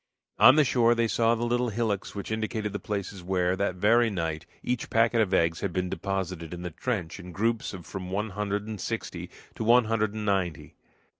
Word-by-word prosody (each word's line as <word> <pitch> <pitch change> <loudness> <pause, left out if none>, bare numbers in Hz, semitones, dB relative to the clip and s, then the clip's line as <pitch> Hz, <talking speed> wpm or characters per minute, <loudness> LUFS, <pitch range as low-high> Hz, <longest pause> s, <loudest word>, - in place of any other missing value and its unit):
On 130 - +9
the 155 - +6
shore 120 -3 +3
they 115 0 +2
saw 115 +1 +2
the 120 +1 -2
little 120 +1 +1
hillocks 110 -3 -2
which 100 +1 -5
indicated 110 -1 -2
the 100 - -3
places 100 -1 -4
where, 90 0 +1
that 95 -1 -1
very 115 +5 +4
night, 80 -5 -3 0.2
each 125 -1 -2
packet 115 0 +3
of 100 -4 +1
eggs 85 -3 +2
had 100 - -1
been 90 0 -2
deposited 95 -4 -3
in 90 - -8
the 90 - -4
trench 95 -2 -3
in 90 -1 -9
groups 115 +4 -1
of 90 -3 -9
from 95 -1 -6
one 105 +3 -2
hundred 105 +1 -2
and 105 -4 -6
sixty - - -4 0.2
to - - -4
one 120 +1 +5
hundred 110 -1 0
and 105 -1 -4
ninety. 90 -7 -1
105 Hz, 210 wpm, -27 LUFS, 90-115 Hz, 0.2 s, On